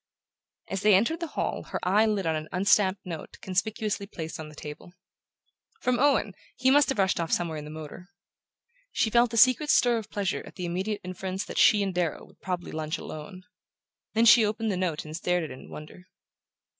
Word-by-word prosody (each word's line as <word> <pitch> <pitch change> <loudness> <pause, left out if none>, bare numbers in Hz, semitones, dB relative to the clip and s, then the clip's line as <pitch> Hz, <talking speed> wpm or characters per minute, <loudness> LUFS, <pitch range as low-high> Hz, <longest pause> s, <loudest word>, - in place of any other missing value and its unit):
As 195 - -3
they 210 -1 +6
entered 235 - +2
the 335 - -3
hall - - -1
her - - -4
eye 210 +4 +4
lit 205 -4 0
on 160 -1 +1
an 155 0 -4
unstamped 190 +1 +2
note 165 -4 -7
conspicuously 200 +2 -2
placed 160 -6 -7
on 155 -1 -7
the 150 - -14
table. 150 +3 -9 0.9
"From 250 -1 +1
Owen! 275 -7 +2 0.2
He 260 +2 +2
must 290 +1 +5
have 270 - -1
rushed 190 -2 +2
off 165 -1 -2
somewhere 165 -3 0
in 150 - -8
the - - -8
motor." 155 +4 -9 0.8
She 220 - 0
felt 235 0 +4
a 230 - -3
secret 255 +6 +5
stir 240 -5 +4
of 215 -1 -10
pleasure 200 -2 -2
at - - -13
the 180 - -4
immediate 190 +5 -2
inference 185 +1 -4
that - - -4
she 210 -2 +6
and 195 -1 -2
Darrow 175 -4 -2
would - - -23
probably 180 -2 -4
lunch 155 -1 -3
alone. 185 +5 -9 0.7
Then 225 +1 +4
she 230 0 +8
opened 215 +1 -1
the - - -1
note 180 -5 -2
and 155 +1 -7
stared 180 0 0
at 155 - -6
it - - -6
in 130 - -12
wonder. 155 +4 -11
190 Hz, 205 wpm, -27 LUFS, 170-220 Hz, 0.9 s, she